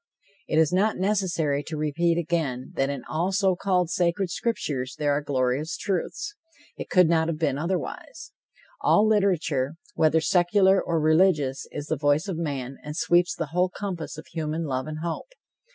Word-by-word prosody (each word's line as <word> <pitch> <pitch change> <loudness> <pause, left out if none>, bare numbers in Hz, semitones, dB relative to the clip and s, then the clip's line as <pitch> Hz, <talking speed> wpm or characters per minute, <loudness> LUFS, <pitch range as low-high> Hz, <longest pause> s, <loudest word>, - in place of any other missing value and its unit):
It 155 - 0
is 160 +1 +3
not 205 +4 +2
necessary 180 -7 0
to 155 - -5
repeat 165 +3 +1
again 160 -7 -2
that 135 0 0
in 140 -3 -4
all 170 +5 -1
so 190 -1 +2
called 180 -2 0
sacred 175 +1 0
scriptures, 145 - -2
there 145 -1 +1
are 145 +1 +1
glorious 140 +5 -1
truths. 200 - -3 0.4
It - - -7
could 180 -2 +5
not 160 -1 +2
have 165 -2 -2
been 145 -4 0
otherwise. 185 - -4 0.5
All 210 +1 +4
literature, 170 -9 +1 0.2
whether 160 0 +3
secular 190 +3 +3
or 165 -1 -1
religious, 155 -4 +2
is 145 - -5
the 155 - -2
voice 145 +5 +2
of 190 - -2
man 135 -5 -4
and 150 +1 -6
sweeps 175 0 +2
the 160 -3 -4
whole 180 +1 +2
compass 180 -5 -5
of 155 - -9
human 160 0 -3
love 130 -1 -2
and 155 0 -5
hope. 170 - -5
165 Hz, 170 wpm, -25 LUFS, 145-185 Hz, 0.5 s, could